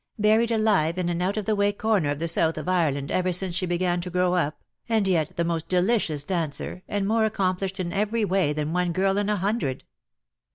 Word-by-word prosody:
Buried 220 +2 +3
alive 205 -7 +2
in 180 -1 -1
an 175 0 -2
out 190 +4 0
of 210 - -2
the 215 - +1
way 200 0 +2
corner 205 -6 0
of 145 - -1
the 165 +3 -2
South 165 -1 +1
of 155 - -5
Ireland 150 -7 0
ever 185 0 +1
since 180 0 0
she 185 0 -1
began 175 0 0
to 180 - -6
grow 180 0 +1
up, 155 -4 -1 0.3
and 220 -3 +2
yet 160 -5 +1
the 170 - 0
most 165 -1 -2
delicious 180 -5 +1
dancer, 165 0 -3
and 200 -1 -1
more 220 +1 +2
accomplished 190 -2 -1
in 175 -2 -3
every 210 +2 0
way 190 -5 +1
than 150 +1 -2
one 180 -1 0
girl 195 +2 +1
in 205 0 -1
a 210 - +1
hundred." 195 - -1
185 Hz, 220 wpm, -25 LUFS, 170-205 Hz, 0.3 s, Buried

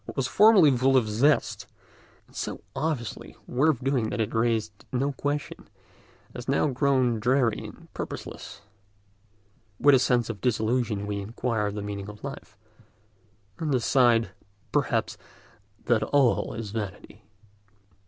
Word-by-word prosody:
What - - -9
was 135 -2 0
formerly 195 - +6
full 130 +2 +3
of 120 -4 +2
zest, 130 +8 +1 0.6
and - - -24
so - - -5
obviously 145 -8 -3
worth 135 0 +1
doing 130 -5 0
that - - -4
it 110 - -1
raised 110 -3 -1
no 135 +3 0
questions, 145 +2 -4 0.7
has 125 - -8
now 140 +2 +2
grown 130 -3 +1
dreary 120 0 +2
and - - -11
purposeless: - - -7 1.2
with 145 0 +6
a 135 - +6
sense 125 -2 +2
of 105 -5 -6
disillusion 110 -3 0
we 105 0 -3
inquire 110 0 -2
the 105 0 -5
meaning 100 -1 -5
of 105 0 -12
life, - - -8 1.0
and 160 -3 -2
decide, 120 -3 +3 0.4
perhaps, - - 0 0.7
that 120 -2 +2
all 140 -4 +2
is 110 -3 -6
vanity. 105 0 -7
120 Hz, 135 wpm, -26 LUFS, 110-135 Hz, 1.2 s, formerly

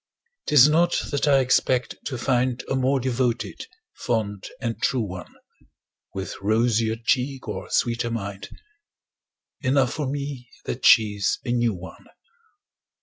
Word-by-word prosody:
'Tis 145 -2 +7
not 170 +3 +3
that 145 +1 0
I 140 -2 +5
expect 125 -1 +1
to 130 - -4
find 125 0 0
A - - -1
more 130 +1 +2
devoted, 125 -1 -2 0.3
fond 105 -4 -2
and 115 -3 -4
true 125 -3 +1
one, 90 -2 -9 0.8
With 95 0 -5
rosier 110 +1 +2
cheek 130 +3 -1
or - - -5
sweeter 120 0 0
mind 100 -4 -5 1.1
Enough 130 -2 +2
for 150 -3 -3
me 140 -3 -5 0.2
that 125 - 0
she's 105 -3 +4
a 120 - -1
new 120 -3 +1
one. 90 +1 -11
120 Hz, 130 wpm, -24 LUFS, 110-135 Hz, 1.1 s, Tis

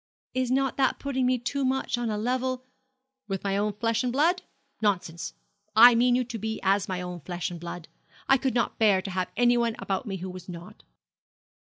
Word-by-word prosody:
'Is 255 -1 0
not 270 0 +1
that 265 -1 +2
putting 265 -2 -1
me 255 0 +3
too 270 +3 -2
much 265 0 0
on 240 -1 -2
a 210 - -1
level 255 +3 -1 0.3
' 265 -1 -56
'With 195 -2 -3
my 195 -1 0
own 205 +1 0
flesh 230 +2 0
and 250 - 0
blood? 330 +8 +2 0.4
Nonsense! 180 -5 -1 0.4
I 240 +2 +10
mean 245 +1 +4
you 250 - +2
to 235 -2 -6
be 220 +1 -3
as 195 +1 +2
my 185 -1 -2
own 180 -1 -6
flesh 175 +3 -4
and 175 - -7
blood. 170 0 -7 0.4
I 270 - +6
could 260 -1 -1
not 235 - 0
bear 200 -4 +4
to 195 - -5
have 185 0 -2
anyone 240 -2 +3
about 195 +4 -3
me 195 -2 -3
who 185 +1 -6
was 185 0 -10
not.' 180 +5 -10
230 Hz, 210 wpm, -27 LUFS, 190-255 Hz, 0.4 s, I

